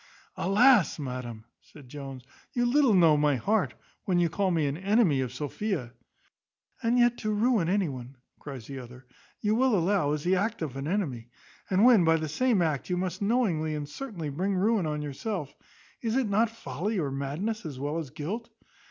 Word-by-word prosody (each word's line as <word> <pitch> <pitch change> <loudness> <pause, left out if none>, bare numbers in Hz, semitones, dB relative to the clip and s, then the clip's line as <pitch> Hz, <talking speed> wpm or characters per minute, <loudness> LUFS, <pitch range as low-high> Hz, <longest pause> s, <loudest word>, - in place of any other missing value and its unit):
"Alas, 210 +2 +4
madam!" 125 -6 -6 0.2
said 145 -4 -16
Jones, 135 -1 -8 0.3
"you 240 0 +1
little 255 -3 +4
know 165 -4 +6
my 145 -1 +3
heart, 205 - 0 0.3
when 185 -2 +1
you 175 -1 +3
call 195 +3 0
me 165 -4 +1
an 140 0 -1
enemy 190 - +2
of 125 -3 -3
Sophia." 145 - -3 0.9
"And 235 0 +2
yet 240 0 +3
to 215 - -1
ruin 210 -4 +2
any 195 -1 +2
one," 130 -1 -8 0.2
cries 135 -6 -8
the 135 +1 -7
other, 125 +1 -12 0.4
"you 210 0 +1
will 245 -1 +3
allow, 175 -4 +1
is 150 -1 -3
the 180 +2 +3
act 205 -2 -1
of 140 -5 -5
an 135 +1 -4
enemy; 140 - -2 0.4
and 195 +4 +4
when 235 -7 +7
by 165 0 +4
the 155 -1 -3
same 225 - +2
act 155 -2 -2
you 180 - 0
must 185 +1 -3
knowingly 195 -9 +1
and 145 -1 -4
certainly 175 - -6
bring 190 +7 -1
ruin 200 -2 +2
on 150 -1 -2
yourself, 150 +2 -4 0.5
is 230 -1 -1
it 265 -3 +2
not 215 +3 +2
folly 205 - -4
or 145 -6 -1
madness, 150 +12 -3
as 150 -6 -6
well 145 +4 -2
as 155 -5 -6
guilt? 185 - -5
175 Hz, 190 wpm, -28 LUFS, 145-215 Hz, 0.9 s, when